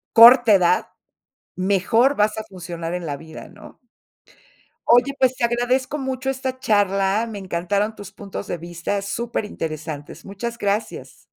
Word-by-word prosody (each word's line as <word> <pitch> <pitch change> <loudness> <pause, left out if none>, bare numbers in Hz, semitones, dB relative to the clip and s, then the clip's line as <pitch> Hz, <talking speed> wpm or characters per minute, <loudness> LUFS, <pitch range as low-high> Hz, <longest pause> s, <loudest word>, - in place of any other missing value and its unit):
corta 235 0 +9
edad, 180 -2 +3 0.7
mejor 200 +8 +2
vas 210 +1 +2
a 220 - -3
funcionar 175 -4 -7
en 180 -1 -4
la 145 -3 -3
vida, 160 +2 -11
¿no? - - -15 1.1
Oye, 245 +4 +4
pues 260 -2 +2
te 235 - +2
agradezco 250 +4 0
mucho 265 -1 -3
esta 260 -1 -3
charla, 200 0 +1
me 220 -3 -7
encantaron 195 +4 -2
tus 205 -1 -10
puntos 200 0 -8
de 175 - -3
vista, 170 +4 -4
súper 225 +2 -3
interesantes. 155 -3 -6
Muchas 235 +4 -5
gracias. 205 +1 -3
205 Hz, 140 wpm, -22 LUFS, 180-240 Hz, 1.1 s, corta